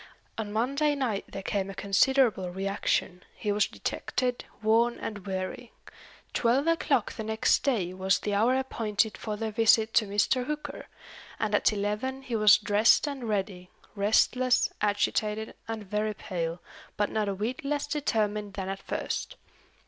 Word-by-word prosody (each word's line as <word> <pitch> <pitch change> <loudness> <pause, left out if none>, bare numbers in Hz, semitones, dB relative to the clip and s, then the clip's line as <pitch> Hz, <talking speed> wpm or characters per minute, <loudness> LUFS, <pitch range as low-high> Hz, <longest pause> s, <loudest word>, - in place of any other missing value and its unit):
On 215 -2 -4
Monday 280 +7 +1
night 240 -8 -1
there 195 - -7
came 195 0 -1
a 195 - -7
considerable 200 -1 +2
reaction; 190 -1 -1
he 210 - -2
was 205 0 +2
dejected, 250 -1 -3 0.2
worn, 230 +2 +3
and 205 -2 -6
weary. 190 +5 -4 0.6
Twelve 250 +4 +2
o'clock 330 0 +1
the 220 - -5
next 220 0 +2
day 210 -11 0
was 190 +1 +2
the 205 - -3
hour 225 +6 +3
appointed 220 -5 0
for 210 +1 -5
their 220 0 -3
visit 225 0 +4
to 215 - +3
Mr. 210 +5 +1
Hooker, 300 0 -5 0.5
and 215 -1 -1
at 205 - +4
eleven 215 +6 -2
he 245 -3 -3
was 215 -2 +7
dressed 210 +5 +4
and 270 -5 -4
ready 190 -3 -2 0.2
restless, 235 +5 +2
agitated, 210 +1 0
and 225 -1 -4
very 210 +2 -2
pale, 170 -4 -4 0.4
but 205 - 0
not 215 -2 0
a 195 - -2
whit 225 +8 -3
less 290 +1 -1
determined 215 -8 -1
than 190 -1 -4
at 195 0 -5
first. - - -4
215 Hz, 155 wpm, -28 LUFS, 200-240 Hz, 0.6 s, was